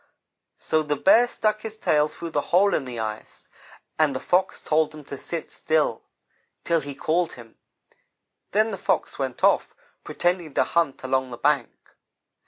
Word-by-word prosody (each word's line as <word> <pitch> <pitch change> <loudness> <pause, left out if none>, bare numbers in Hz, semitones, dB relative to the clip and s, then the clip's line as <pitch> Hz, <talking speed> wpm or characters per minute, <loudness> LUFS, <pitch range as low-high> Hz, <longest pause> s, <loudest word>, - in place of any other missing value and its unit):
"So 155 - 0
the 150 -1 -1
Bear 225 - +5
stuck 215 -2 -1
his 220 0 -7
tail 150 -7 +2
through 165 +2 -8
the 145 - +1
hole 195 +3 +4
in 135 - 0
the 125 -2 -7
ice, 110 -1 -6 0.5
and 150 -3 +3
the - - -1
Fox 185 +5 +1
told 155 0 +1
him 150 - -10
to 140 - -7
sit 165 +4 -5
still, 155 -8 0 0.6
till 170 -1 +2
he 140 -1 -7
called 170 +4 0
him; 115 -2 -14 0.9
then 215 +2 +2
the 195 - -5
Fox - - -1
went - - -4
off, - - +3 0.3
pretending 175 -4 -1
to - - +4
hunt 165 -6 0
along 130 0 0
the 120 - -7
bank. 140 -3 -1
155 Hz, 170 wpm, -24 LUFS, 135-180 Hz, 0.9 s, Bear